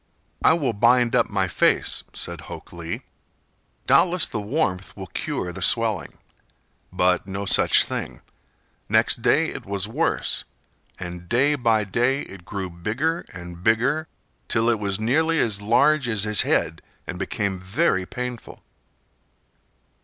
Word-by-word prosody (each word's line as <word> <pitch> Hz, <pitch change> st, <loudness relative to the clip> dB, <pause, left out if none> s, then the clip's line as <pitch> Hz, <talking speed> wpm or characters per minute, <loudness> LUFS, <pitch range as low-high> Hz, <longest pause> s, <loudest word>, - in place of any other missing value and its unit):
"I -, -, +6 dB
will 145 Hz, -8 st, 0 dB
bind 120 Hz, +3 st, +3 dB
up -, -, +2 dB
my -, -, 0 dB
face," -, -, +2 dB
said 85 Hz, -3 st, -4 dB
Hok 70 Hz, -, -10 dB
Lee. 85 Hz, -1 st, -6 dB, 0.8 s
"Doubtless 180 Hz, -1 st, +5 dB
the 110 Hz, -, -4 dB
warmth 100 Hz, -, -2 dB
will 95 Hz, -, -6 dB
cure 90 Hz, -1 st, -4 dB
the -, -, -8 dB
swelling." -, -, +1 dB, 0.7 s
But 90 Hz, +1 st, +1 dB
no 100 Hz, +1 st, -4 dB
such 95 Hz, -, +4 dB
thing. -, -, -5 dB, 0.7 s
Next -, -, +3 dB
day -, -, +3 dB
it -, -, -7 dB
was 100 Hz, 0 st, -2 dB
worse, 155 Hz, +9 st, 0 dB, 0.5 s
and 90 Hz, -1 st, -8 dB
day 140 Hz, +5 st, +3 dB
by 115 Hz, -6 st, +2 dB
day 120 Hz, +7 st, 0 dB
it 95 Hz, -3 st, -12 dB
grew 95 Hz, -3 st, -5 dB
bigger 125 Hz, -, -2 dB
and 85 Hz, -1 st, -10 dB
bigger 125 Hz, -, +1 dB, 0.4 s
till 115 Hz, 0 st, +1 dB
it 115 Hz, -2 st, +1 dB
was 100 Hz, -1 st, -2 dB
nearly 160 Hz, +9 st, +1 dB
as 105 Hz, -7 st, 0 dB
large 125 Hz, +6 st, +3 dB
as 110 Hz, -4 st, 0 dB
his 105 Hz, -1 st, +5 dB
head 80 Hz, +1 st, 0 dB, 0.2 s
and 90 Hz, -, -6 dB
became 100 Hz, -1 st, -2 dB
very 95 Hz, -, 0 dB
painful. 125 Hz, -1 st, -7 dB
105 Hz, 140 wpm, -23 LUFS, 95-125 Hz, 0.8 s, I